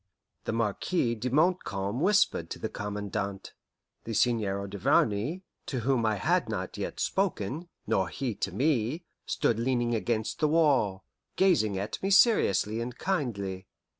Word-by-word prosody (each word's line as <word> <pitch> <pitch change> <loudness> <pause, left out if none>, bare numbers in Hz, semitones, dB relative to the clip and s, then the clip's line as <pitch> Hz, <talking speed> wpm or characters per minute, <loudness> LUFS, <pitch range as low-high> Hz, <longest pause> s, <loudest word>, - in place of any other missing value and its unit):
The - - -1
Marquis 115 - 0
de 120 +3 -3
Montcalm 125 - +1
whispered 200 - +2
to - - -5
the - - -4
Commandant. 100 -1 -4 0.5
The 115 - -4
Seigneur 100 -5 +1
Duvarney, 105 - +1 0.2
to 130 -4 -2
whom 120 -2 +1
I 110 - +2
had 95 - +1
not - - -4
yet - - -5
spoken, 170 - -1 0.2
nor 95 -2 +1
he 130 -4 -3
to 100 - -3
me, 135 - 0 0.2
stood 115 - +1
leaning 120 -1 +1
against 110 -1 -1
the 155 - +3
wall, 140 -12 +2 0.3
gazing 130 - +3
at 100 +2 -4
me 195 - -1
seriously 115 - +4
and 120 0 -5
kindly. 100 - -2
115 Hz, 140 wpm, -29 LUFS, 100-150 Hz, 0.5 s, seriously